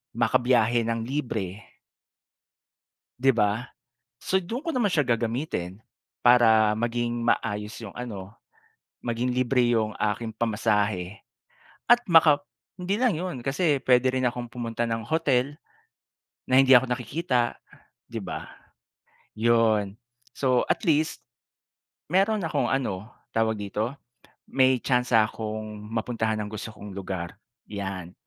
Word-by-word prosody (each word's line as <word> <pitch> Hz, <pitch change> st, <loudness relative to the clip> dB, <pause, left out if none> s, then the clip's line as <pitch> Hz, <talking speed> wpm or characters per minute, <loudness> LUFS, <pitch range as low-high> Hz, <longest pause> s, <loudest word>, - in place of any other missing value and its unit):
makabiyahe 120 Hz, 0 st, +2 dB
nang 115 Hz, -1 st, -1 dB
libre. 115 Hz, -8 st, -4 dB, 1.4 s
'Di 135 Hz, 0 st, +4 dB
ba? 105 Hz, +2 st, +1 dB, 0.6 s
So, 190 Hz, -, +1 dB
do'n 210 Hz, +8 st, -4 dB
ko 335 Hz, -, -4 dB
naman 240 Hz, -, +1 dB
siya 150 Hz, -, +4 dB
gagamitin. 115 Hz, -, -2 dB, 0.4 s
Para 110 Hz, -3 st, +5 dB
maging 120 Hz, 0 st, -1 dB
maayos 105 Hz, -1 st, -1 dB
'yong 105 Hz, -, -7 dB
ano, 100 Hz, -6 st, -6 dB, 0.7 s
maging 120 Hz, +1 st, -1 dB
libre 125 Hz, 0 st, +2 dB
'yong 110 Hz, -2 st, +1 dB
aking 105 Hz, +2 st, -1 dB
pamasahe 105 Hz, -4 st, 0 dB, 0.7 s
at 240 Hz, 0 st, +8 dB
maka 160 Hz, -4 st, +6 dB, 0.4 s
hindi 185 Hz, +3 st, -1 dB
lang 245 Hz, 0 st, +2 dB
'yon, 180 Hz, -2 st, -4 dB
kasi 145 Hz, 0 st, +1 dB
puwede 125 Hz, 0 st, +4 dB
rin 130 Hz, -1 st, 0 dB
akong 120 Hz, 0 st, -2 dB
pumunta 115 Hz, 0 st, -3 dB
ng 115 Hz, -1 st, -2 dB
hotel 145 Hz, -1 st, 0 dB, 0.9 s
na 130 Hz, -, +3 dB
hindi 135 Hz, -1 st, +6 dB
ako 125 Hz, +1 st, +2 dB
nakikita, 125 Hz, 0 st, -1 dB, 0.5 s
'di -, -, -6 dB
ba? -, -, -6 dB, 0.8 s
'Yon. 110 Hz, -3 st, +2 dB, 0.4 s
So 130 Hz, -2 st, +2 dB
at -, -, 0 dB
least, 155 Hz, -3 st, +1 dB, 0.8 s
mayroon 200 Hz, +3 st, +2 dB
akong 155 Hz, -5 st, -1 dB
ano, 110 Hz, -5 st, -2 dB, 0.2 s
tawag 110 Hz, -1 st, +1 dB
dito, 105 Hz, +4 st, -2 dB, 0.6 s
may 130 Hz, -1 st, +4 dB
tsansa 125 Hz, -3 st, +3 dB
akong 110 Hz, -1 st, -6 dB
mapuntahan 110 Hz, 0 st, -1 dB
ang 105 Hz, -, -6 dB
gusto 110 Hz, +1 st, -5 dB
kong 105 Hz, -1 st, -10 dB
lugar, 95 Hz, -1 st, -6 dB, 0.3 s
'yan. 95 Hz, -4 st, -5 dB
120 Hz, 120 wpm, -26 LUFS, 110-130 Hz, 1.4 s, at